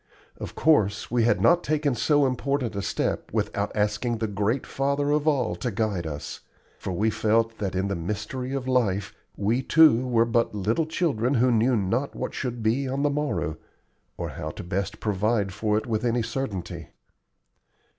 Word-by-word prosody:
Of -, -, -7 dB
course 110 Hz, -11 st, +2 dB
we 120 Hz, -2 st, +3 dB
had 120 Hz, -, +3 dB
not 175 Hz, +1 st, +4 dB
taken 150 Hz, -2 st, +1 dB
so 145 Hz, +4 st, +3 dB
important 130 Hz, -3 st, -1 dB
a 100 Hz, -, -1 dB
step -, -, -2 dB
without 100 Hz, 0 st, -1 dB
asking 105 Hz, +3 st, 0 dB
the 110 Hz, -, -1 dB
Great 105 Hz, +5 st, -1 dB
Father 140 Hz, +1 st, 0 dB
of 150 Hz, +1 st, +1 dB
all 135 Hz, -7 st, +2 dB
to 125 Hz, -, -2 dB
guide 105 Hz, -7 st, -1 dB
us; 75 Hz, -2 st, -6 dB, 0.4 s
for -, -, -4 dB
we 105 Hz, +5 st, +1 dB
felt 115 Hz, +1 st, +1 dB
that 95 Hz, -3 st, -2 dB
in 95 Hz, +1 st, 0 dB
the 100 Hz, -, -1 dB
mystery 105 Hz, +9 st, -4 dB
of 130 Hz, -1 st, -3 dB
life 105 Hz, -7 st, +1 dB, 0.2 s
we 110 Hz, +5 st, +1 dB
too 135 Hz, -4 st, +5 dB
were 115 Hz, -2 st, +3 dB
but 115 Hz, -2 st, +1 dB
little 110 Hz, -, 0 dB
children 145 Hz, -7 st, 0 dB
who 125 Hz, +1 st, +3 dB
knew 120 Hz, +2 st, +3 dB
not 115 Hz, +7 st, -1 dB
what -, -, -4 dB
should 120 Hz, -3 st, -4 dB
be 125 Hz, +5 st, +1 dB
on 135 Hz, +2 st, -1 dB
the 145 Hz, -, +2 dB
morrow, 140 Hz, -, -2 dB, 0.6 s
or -, -, -3 dB
how 75 Hz, -, -5 dB
best 95 Hz, +3 st, -3 dB
to -, -, -14 dB
provide 105 Hz, -1 st, 0 dB
for 105 Hz, +1 st, 0 dB
it 110 Hz, -, -2 dB
with 110 Hz, -2 st, -1 dB
any 120 Hz, -1 st, +1 dB
certainty. 115 Hz, -5 st, -4 dB
115 Hz, 180 wpm, -26 LUFS, 105-135 Hz, 0.6 s, too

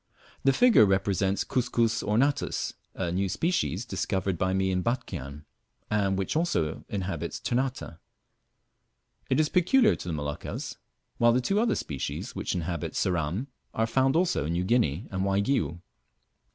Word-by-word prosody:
The 135 Hz, -, +5 dB
figure 240 Hz, -, +6 dB
represents 95 Hz, 0 st, +1 dB
Cuscus 120 Hz, -3 st, +1 dB
ornatus, 130 Hz, +7 st, 0 dB, 0.2 s
a 90 Hz, -3 st, -2 dB
new 95 Hz, +2 st, 0 dB
species 125 Hz, -, 0 dB
discovered 95 Hz, -5 st, -1 dB
by 95 Hz, +2 st, 0 dB
me 95 Hz, 0 st, +1 dB
in 90 Hz, 0 st, +1 dB
Batchian, 75 Hz, -, -4 dB, 0.5 s
and 100 Hz, -2 st, +1 dB
which 95 Hz, +7 st, -2 dB
also 155 Hz, -, 0 dB
inhabits 95 Hz, -2 st, -3 dB
Ternate. 125 Hz, -, -2 dB, 1.3 s
It -, -, +2 dB
is 155 Hz, -, +4 dB
peculiar 215 Hz, -, +4 dB
to -, -, -9 dB
the 85 Hz, -, -2 dB
Moluccas, 75 Hz, -1 st, -5 dB, 0.4 s
while 120 Hz, 0 st, +5 dB
the 125 Hz, -, +3 dB
two 195 Hz, +11 st, +1 dB
other 230 Hz, +1 st, +2 dB
species 70 Hz, -4 st, -4 dB
which -, -, -2 dB
inhabit 85 Hz, -2 st, -3 dB
Ceram 90 Hz, -, 0 dB, 0.3 s
are 110 Hz, -, +2 dB
found 130 Hz, +4 st, +2 dB
also 170 Hz, -, +2 dB
in 85 Hz, -, -1 dB
New 90 Hz, +1 st, 0 dB
Guinea 95 Hz, -, +1 dB
and 95 Hz, -1 st, -1 dB
Waigiou. 100 Hz, -, 0 dB
100 Hz, 145 wpm, -28 LUFS, 90-130 Hz, 1.3 s, figure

